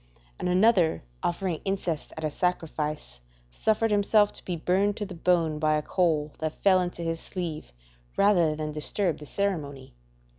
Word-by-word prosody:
And -, -, -1 dB
another 185 Hz, -, +3 dB, 0.2 s
offering 175 Hz, -1 st, -2 dB
incense 185 Hz, -5 st, -2 dB
at 160 Hz, -, -5 dB
a 155 Hz, -, -1 dB
sacrifice, 155 Hz, -, -2 dB, 0.3 s
suffered 220 Hz, -, +1 dB
himself 205 Hz, 0 st, +3 dB
to -, -, -10 dB
be 180 Hz, -, -3 dB
burned 190 Hz, +5 st, +1 dB
to 210 Hz, -, -3 dB
the 195 Hz, -, -8 dB
bone 165 Hz, -3 st, +1 dB
by 155 Hz, -1 st, +2 dB
a 150 Hz, -, -2 dB
coal 155 Hz, -5 st, 0 dB
that 155 Hz, -1 st, -4 dB
fell 185 Hz, -2 st, +5 dB
into 175 Hz, -1 st, -4 dB
his 165 Hz, 0 st, -2 dB
sleeve, 165 Hz, -, -5 dB, 0.5 s
rather 175 Hz, -6 st, +4 dB
than 155 Hz, 0 st, -4 dB
disturb 165 Hz, +4 st, 0 dB
the 150 Hz, -, -10 dB
ceremony. 145 Hz, -, -3 dB
170 Hz, 160 wpm, -27 LUFS, 155-195 Hz, 0.5 s, fell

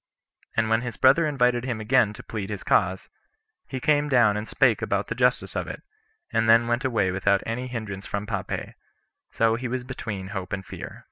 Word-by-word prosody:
And 115 Hz, 0 st, +3 dB
when 115 Hz, +1 st, +2 dB
his 125 Hz, -4 st, -5 dB
brother 140 Hz, +5 st, +5 dB
invited 125 Hz, -4 st, +2 dB
him 125 Hz, -4 st, -3 dB
again 110 Hz, 0 st, +3 dB
[to -, -, -11 dB
plead 105 Hz, -3 st, -5 dB
his 105 Hz, -2 st, -5 dB
cause], 95 Hz, 0 st, +1 dB, 0.6 s
he 130 Hz, -, -4 dB
came 145 Hz, +2 st, +2 dB
down 120 Hz, -6 st, +4 dB
and 105 Hz, +1 st, -4 dB
spake 120 Hz, -6 st, +3 dB
about 100 Hz, 0 st, -1 dB
the -, -, 0 dB
justice 125 Hz, +1 st, +1 dB
of -, -, -2 dB
it, -, -, -7 dB, 0.5 s
and 115 Hz, 0 st, +2 dB
then 115 Hz, +1 st, +6 dB
went 120 Hz, +3 st, 0 dB
away 110 Hz, -8 st, +1 dB
without 95 Hz, +1 st, +1 dB
any 125 Hz, +3 st, -3 dB
hinderance 110 Hz, -5 st, -6 dB
from 100 Hz, 0 st, -3 dB
Pompey; 100 Hz, -3 st, -4 dB, 0.6 s
so 115 Hz, 0 st, +2 dB
he 125 Hz, +2 st, -2 dB
was 125 Hz, +1 st, -3 dB
between 105 Hz, -7 st, -6 dB
hope 95 Hz, -2 st, -5 dB
and 95 Hz, -1 st, -4 dB
fear. -, -, -8 dB
115 Hz, 200 wpm, -25 LUFS, 100-125 Hz, 0.6 s, then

